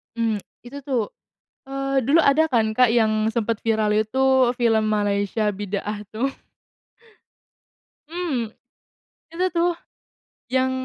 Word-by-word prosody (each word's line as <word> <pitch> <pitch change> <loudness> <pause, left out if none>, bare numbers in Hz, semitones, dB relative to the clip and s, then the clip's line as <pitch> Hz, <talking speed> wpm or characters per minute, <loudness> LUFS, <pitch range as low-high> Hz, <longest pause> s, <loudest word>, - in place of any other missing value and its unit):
Mmm, 225 -3 0 0.2
itu 275 +4 -9
tuh, 255 -6 -2 0.6
eee, 275 0 -1
dulu 325 +3 +5
ada 310 +3 +4
kan, 225 -5 +1
Kak, 250 +2 +4
yang 220 -1 +2
sempat 230 -1 0
viral 220 -2 +1
itu 255 +3 +2
film 225 -3 +2
Malaysia, 205 0 0
Bidaah 205 +1 -5
tuh. 245 +6 -2 1.8
Mmm, 305 -10 -3 0.8
itu 360 +2 -1
tuh, 345 +1 +3 0.8
yang 260 0 +2
230 Hz, 110 wpm, -23 LUFS, 215-270 Hz, 1.8 s, dulu